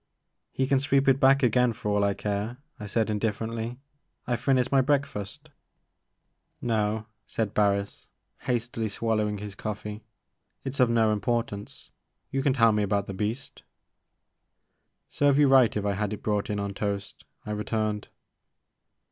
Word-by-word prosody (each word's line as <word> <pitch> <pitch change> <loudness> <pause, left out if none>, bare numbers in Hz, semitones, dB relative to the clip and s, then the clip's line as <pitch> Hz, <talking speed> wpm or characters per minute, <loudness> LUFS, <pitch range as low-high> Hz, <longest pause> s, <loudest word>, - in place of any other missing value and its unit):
" - - -54
He 135 - 0
can 135 0 +3
sweep 140 0 +2
it 135 0 +5
back 135 +1 +5
again 125 0 +3
for 110 -2 -3
all 105 0 +2
I 100 -1 +1
care,*' 105 +4 -3 0.2
I 105 - -6
said 110 +1 0
indifferently, 115 +2 -2 0.5
'*I 120 - 0
*ve 120 - -7
finished 130 -2 +2
my 135 -1 +5
break 140 +1 +2
fast.*' 140 +5 -8 1.1
No," 110 -2 0 0.2
said 110 -3 -2
Harris, 100 -1 0 0.3
hastily 115 -2 -2
swallowing 105 -1 0
his 105 0 -7
coffee, 105 +1 -6 0.6
it 135 - -4
's 140 - -6
of 125 -2 +5
no 110 -2 +3
importance; 105 -1 -3 0.4
you 135 - 0
can 135 -1 +2
tell 115 -4 +5
me 105 0 +1
about 100 0 0
the 95 - -6
beast 105 +7 -4 0.7
" - - -51
Serve 145 -1 +2
you 145 -1 +6
right 130 -5 +5
if 105 - -2
I 100 - +1
had 105 +1 -2
it 105 - -7
brought 105 -1 0
in 105 -1 -1
on 100 0 -3
toast," 100 0 -4 0.2
I 105 - -4
returned. 105 0 -2
110 Hz, 165 wpm, -27 LUFS, 105-125 Hz, 1.1 s, you